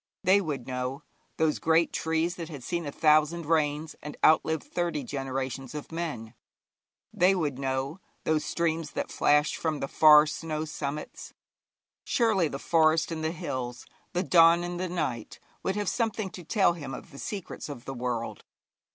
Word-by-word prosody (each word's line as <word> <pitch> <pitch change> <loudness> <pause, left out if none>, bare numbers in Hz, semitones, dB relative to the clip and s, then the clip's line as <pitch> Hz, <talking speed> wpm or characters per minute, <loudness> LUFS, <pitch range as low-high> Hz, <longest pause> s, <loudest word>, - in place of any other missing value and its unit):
They 195 +3 +5
would 145 -8 -4
know, 125 +1 -4 0.3
those 160 -1 +1
great 165 +1 +3
trees 160 +2 0
that 165 -2 -6
had 145 -6 -8
seen 170 +1 -3
a - - -3
thousand 155 +3 +3
rains, 155 0 0
and 150 - -8
outlived 160 0 +4
thirty 170 -5 -2
generations 135 0 -4
of 150 - -7
men; 155 -10 -4 0.8
they 185 +2 +4
would 145 -7 -1
know, 135 +4 -2 0.2
those 155 -1 +1
streams 165 -2 -1
that - - -3
flashed 150 +1 +3
from 155 -3 -1
the 135 - -2
far 150 +1 +7
snow 155 +1 -3
summits; 150 -1 -6 0.7
surely 220 - +2
the 135 - -5
forest 160 +2 +3
and 160 -1 -4
the 160 - +1
hills, 125 -7 -5 0.3
the 180 - +1
dawn 170 -1 +6
and 175 0 -4
the 185 0 -2
night, 130 -10 -3 0.2
would 190 - -1
have 205 -1 -2
something 220 -4 -1
to 180 - -9
tell 190 +2 +3
him 145 -6 -6
of - - -11
the 140 - -11
secrets 195 -6 -6
of 125 -4 -8
the 135 - -5
world. 120 -2 -3
155 Hz, 170 wpm, -28 LUFS, 140-170 Hz, 0.8 s, far